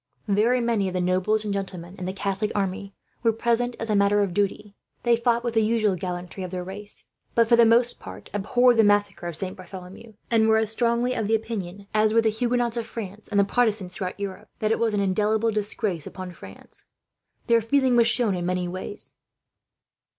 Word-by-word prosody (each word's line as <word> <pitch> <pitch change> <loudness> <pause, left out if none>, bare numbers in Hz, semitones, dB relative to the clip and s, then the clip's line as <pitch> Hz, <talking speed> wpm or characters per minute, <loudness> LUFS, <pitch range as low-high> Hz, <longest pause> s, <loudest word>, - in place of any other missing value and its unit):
Very 215 +5 +3
many 230 -5 +1
of 185 - -4
the - - +1
nobles 185 +4 +1
and 205 - -1
gentlemen 185 -2 -5
in 180 - -4
the 185 - -2
Catholic 200 +2 -2
army 195 0 -2 0.3
were 230 - +3
present, 235 +2 0
as 225 -1 -1
a - - +2
matter 200 +1 +3
of 190 -3 -2
duty. 205 +1 -2 0.3
They 240 -1 +4
fought 235 0 +1
with 235 -2 -2
the 225 - +3
usual 215 -2 +2
gallantry 180 +1 -5
of 185 - -5
their 180 0 -4
race, 205 +3 -8 0.3
but 230 -1 +4
for 235 - +6
the 235 -1 +6
most 235 +2 +3
part - - -10
abhorred 245 +4 +3
the 225 - +6
massacre 205 -3 +2
of 170 - -4
Saint 185 +3 -4
Bartholomew; 185 +3 -11 0.2
and 220 -1 +4
were 220 0 +5
as 220 -1 0
strongly 235 +2 +1
of 220 -4 -2
opinion 205 -4 -2
as 215 0 +3
were 230 - +6
the 225 - +2
Huguenots 240 +1 0
of 230 - -3
France, 210 -1 -7
and 205 -2 +1
the - - +6
Protestants 205 -3 +1
throughout 185 +1 -4
Europe, 200 -2 -6
that 215 0 0
it - - +1
was 225 -2 +1
an 200 - +1
indelible 210 +3 +1
disgrace 205 -5 -2
upon 185 -1 -7
France. 95 - -13 0.6
Their 230 -1 +4
feeling 260 +2 +2
was 235 -1 +5
shown 235 -3 +2
in 180 -1 -3
many 180 0 -1
ways. 185 +3 -6
210 Hz, 210 wpm, -25 LUFS, 190-230 Hz, 0.6 s, for